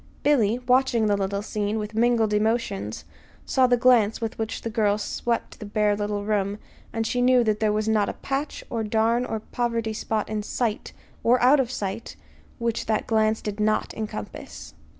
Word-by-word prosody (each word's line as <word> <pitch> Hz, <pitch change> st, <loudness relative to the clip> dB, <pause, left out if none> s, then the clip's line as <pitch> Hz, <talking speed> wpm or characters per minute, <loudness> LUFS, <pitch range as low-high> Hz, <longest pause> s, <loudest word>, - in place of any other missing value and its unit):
Billy, 240 Hz, -7 st, +3 dB
watching 250 Hz, -2 st, +3 dB
the 205 Hz, -1 st, +3 dB
little 200 Hz, 0 st, -2 dB
scene, 210 Hz, 0 st, -2 dB
with 210 Hz, 0 st, -4 dB
mingled 225 Hz, -1 st, +2 dB
emotions, 210 Hz, -, -1 dB, 0.4 s
saw 260 Hz, -1 st, +3 dB
the 245 Hz, 0 st, +3 dB
glance 235 Hz, -4 st, +4 dB
with 225 Hz, -1 st, -3 dB
which 220 Hz, 0 st, -3 dB
the 230 Hz, -, -2 dB
girl 210 Hz, -2 st, +2 dB
swept 235 Hz, +2 st, -3 dB
the -, -, -7 dB
bare 210 Hz, 0 st, +2 dB
little 205 Hz, 0 st, -2 dB
room; 205 Hz, -1 st, 0 dB, 0.3 s
and 225 Hz, 0 st, -2 dB
she 245 Hz, +2 st, 0 dB
knew 250 Hz, 0 st, +5 dB
that 215 Hz, -2 st, 0 dB
there 215 Hz, -1 st, +2 dB
was 215 Hz, +1 st, -1 dB
not 215 Hz, -2 st, +2 dB
a -, -, -3 dB
patch 275 Hz, +2 st, -4 dB
or 230 Hz, -2 st, -1 dB
darn 225 Hz, +3 st, +1 dB
or 220 Hz, -, -2 dB
poverty 230 Hz, 0 st, -2 dB
spot 215 Hz, 0 st, -2 dB
in 215 Hz, -1 st, -2 dB
sight, 220 Hz, +1 st, -2 dB, 0.3 s
or 245 Hz, +2 st, +4 dB
out 265 Hz, +4 st, +5 dB
of 255 Hz, -3 st, +1 dB
sight, 210 Hz, -2 st, -4 dB, 0.4 s
which 235 Hz, -2 st, -2 dB
that 215 Hz, -1 st, 0 dB
glance 220 Hz, -1 st, +1 dB
did 210 Hz, 0 st, -4 dB
not 215 Hz, 0 st, +1 dB
encompass. 105 Hz, -, -7 dB
220 Hz, 185 wpm, -25 LUFS, 210-235 Hz, 0.4 s, knew